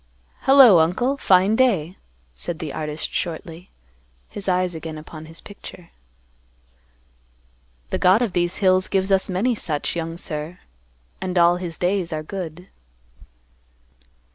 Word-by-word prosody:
"Hello, 265 -9 +8
uncle. 195 +12 +1
Fine 195 -3 +3
day," 190 -10 +2 0.4
said - - -5
the - - -6
artist 150 0 -4
shortly, 165 +1 -5 0.6
his 200 -2 -5
eyes 180 -1 +1
again 160 -1 -7
upon 155 +1 -10
his 165 +1 -11
picture. 180 -4 -12 2.0
"The - - -1
God 190 +6 +4
of 215 -7 -2
these 175 0 0
hills 185 -1 +3
gives 195 0 0
us 190 0 +2
many 200 +7 +1
such, 160 -9 -3
young 165 0 -4
sir, 155 +1 -6 0.6
and 185 -1 -3
all 175 0 +5
His 175 -2 -6
days 180 -1 -1
are 155 -1 -3
good." 180 0 -7
180 Hz, 130 wpm, -22 LUFS, 165-195 Hz, 2.0 s, Hello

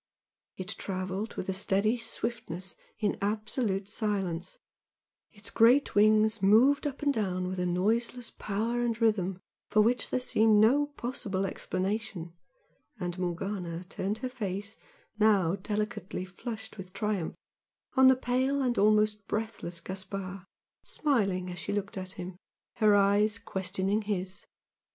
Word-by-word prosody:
It 185 0 -6
travelled 190 +1 -3
with - - -4
a 190 - 0
steady 200 +4 +2
swiftness 190 -7 -4 0.2
in 210 -2 -1
absolute 210 -1 -1
silence, 195 -5 -2 0.7
its 210 0 -7
great 245 +5 +5
wings 215 +1 +4
moved 255 +10 +5
up 285 0 -6
and 285 -1 +3
down 185 -5 -1
with 185 0 -3
a 180 - 0
noiseless 230 +7 0
power 225 +4 -2
and 235 -2 0
rhythm 195 -5 +1 0.3
for 215 - +5
which 245 +3 +2
there - - +1
seemed 220 -3 +3
no 270 +7 +5
possible 235 -8 -3
explanation, 185 -2 -3 0.7
and 175 -1 -3
Morgana 180 -1 -3
turned 195 +3 -3
her - - -1
face, 205 -3 -4 0.4
now 200 -5 +4
delicately 210 -2 -3
flushed 220 +3 -7
with 185 -1 -9
triumph, 210 -6 -2 0.6
on 265 0 +7
the 260 - +7
pale 260 +2 +1
and 245 -2 +1
almost 210 0 +3
breathless 215 -6 -3
Gaspard, 190 0 -5 0.4
smiling 195 - 0
as 180 - -6
she 205 - -3
looked 200 -1 -3
at 185 -1 -5
him, 180 0 -7 0.4
her 215 -2 +5
eyes 205 +1 +4
questioning 190 0 -1
his. 190 -3 -4
205 Hz, 135 wpm, -30 LUFS, 185-225 Hz, 0.7 s, on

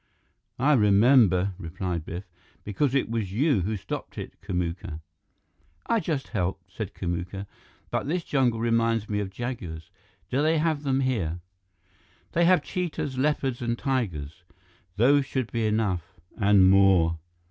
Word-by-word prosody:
"I 145 +4 +3
remember," 105 - +5
replied 85 -1 -4
Biff, 90 +3 -5 0.4
"because 125 +7 0
it 135 - +2
was 110 -5 -2
you 130 - +2
who 105 +4 -2
stopped 90 - -6
it, - - -6
Kamuka." 90 -2 -3 0.9
"I 230 - +2
just 155 -9 -3
helped," 95 -2 -3
said 105 -2 -5
Kamuka. 90 +2 -4 0.5
"But - - -1
this 170 +3 -1
jungle 125 -7 +1
reminds 115 -1 +1
me 105 -1 -1
of 100 -2 -3
jaguars. 95 -6 -6 0.4
Do 130 +3 +1
they 160 +2 +3
have 155 -2 +1
them 135 -2 +1
here?" 100 -11 -1 0.9
"They 170 0 +3
have 180 +1 +4
cheetahs, 165 -7 -3
leopards, 135 -3 0
and 120 0 -1
tigers. 95 - -2 0.5
Those 135 +5 +4
should 130 -4 -2
be 115 -2 0
enough 105 -6 -1 0.2
and 100 -3 +5
more." 95 -4 +4
110 Hz, 140 wpm, -26 LUFS, 95-135 Hz, 0.9 s, remember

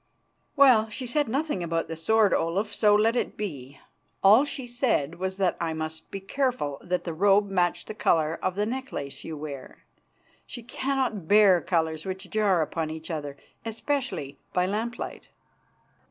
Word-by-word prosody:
"Well, 250 -6 +6
she 230 +5 -5
said 290 +4 0
nothing 275 - -1
about 165 -1 -1
the 165 - -5
sword, 210 +6 +3
Olaf, 195 +6 0
so 210 -1 +4
let 225 +3 +3
it - - -2
be. 140 -10 -6 0.4
All 215 +8 +7
she 270 -3 -5
said 235 - 0
was 190 0 -3
that 190 -3 +1
I 165 -1 -1
must 160 0 -5
be 195 - -5
careful 240 - -1
that 180 0 -1
the 170 - -4
robe 200 +3 +3
matched 175 -2 +1
the - - -6
colour 160 -6 +1
of 185 -1 -1
the 205 +1 0
necklace 240 - -5
you 160 -1 -6
wear. 145 -3 -8 0.6
She 240 - -7
cannot 250 -6 -2
bear 200 -3 +6
colours 160 -2 -1
which 190 0 -6
jar 200 -6 +3
upon 160 +1 -3
each 160 +1 -6
other, 145 -3 -5 0.3
especially 230 - -3
by 180 0 +2
lamp 220 +5 -2
light." - - -7
195 Hz, 170 wpm, -26 LUFS, 160-225 Hz, 0.6 s, All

